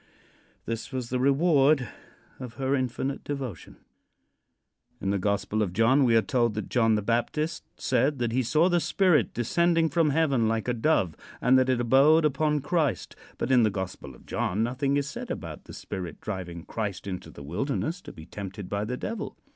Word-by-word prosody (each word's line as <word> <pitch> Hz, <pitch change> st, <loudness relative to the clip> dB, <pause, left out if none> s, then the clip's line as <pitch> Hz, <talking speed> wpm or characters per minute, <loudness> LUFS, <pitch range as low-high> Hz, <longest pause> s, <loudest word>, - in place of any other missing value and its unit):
This 115 Hz, +3 st, -4 dB
was 125 Hz, -3 st, -4 dB
the 125 Hz, -, 0 dB
reward 140 Hz, -1 st, +3 dB, 0.5 s
of 125 Hz, -3 st, -8 dB
her 135 Hz, +1 st, -1 dB
infinite 130 Hz, +1 st, -2 dB
devotion. 135 Hz, -, -6 dB, 1.2 s
In 95 Hz, -, -1 dB
the 100 Hz, -, 0 dB
Gospel 100 Hz, +2 st, 0 dB
of 95 Hz, -4 st, -1 dB
John 120 Hz, +7 st, +4 dB
we 115 Hz, -2 st, +4 dB
are 110 Hz, -, +4 dB
told 120 Hz, -7 st, +1 dB
that 105 Hz, -, -4 dB
John 115 Hz, -3 st, +3 dB
the 105 Hz, -, -1 dB
Baptist 150 Hz, +9 st, -1 dB, 0.2 s
said 145 Hz, +1 st, +1 dB
that 120 Hz, -2 st, -1 dB
he 130 Hz, +3 st, +1 dB
saw 155 Hz, +8 st, +3 dB
the 175 Hz, -1 st, +3 dB
Spirit 180 Hz, -1 st, +2 dB
descending 165 Hz, +7 st, +2 dB
from 155 Hz, +1 st, +2 dB
heaven 140 Hz, -6 st, +2 dB
like 110 Hz, 0 st, -1 dB
a 125 Hz, -, +1 dB
dove, 110 Hz, -, +1 dB, 0.2 s
and 125 Hz, +2 st, +4 dB
that 130 Hz, 0 st, +2 dB
it 130 Hz, -2 st, +2 dB
abode 140 Hz, +7 st, +5 dB
upon 150 Hz, +1 st, +1 dB
Christ. 145 Hz, -, -1 dB, 0.2 s
But 130 Hz, -, -2 dB
in 125 Hz, -2 st, +6 dB
the 110 Hz, -, +4 dB
Gospel 95 Hz, -2 st, -6 dB
of -, -, -19 dB
John 105 Hz, +5 st, -1 dB
nothing 135 Hz, +4 st, 0 dB
is 140 Hz, 0 st, -1 dB
said -, -, -7 dB
about -, -, -6 dB
the -, -, -11 dB
Spirit 90 Hz, -4 st, -6 dB
driving 90 Hz, -5 st, -6 dB
Christ 100 Hz, -5 st, -4 dB
into 95 Hz, -2 st, -6 dB
the 70 Hz, -, -11 dB
wilderness 135 Hz, -, -2 dB
to -, -, -10 dB
be 80 Hz, -, -12 dB
tempted 100 Hz, 0 st, -7 dB
by 100 Hz, +1 st, -1 dB
the 125 Hz, +3 st, -3 dB
Devil. 230 Hz, -, -5 dB
125 Hz, 185 wpm, -27 LUFS, 105-145 Hz, 1.2 s, in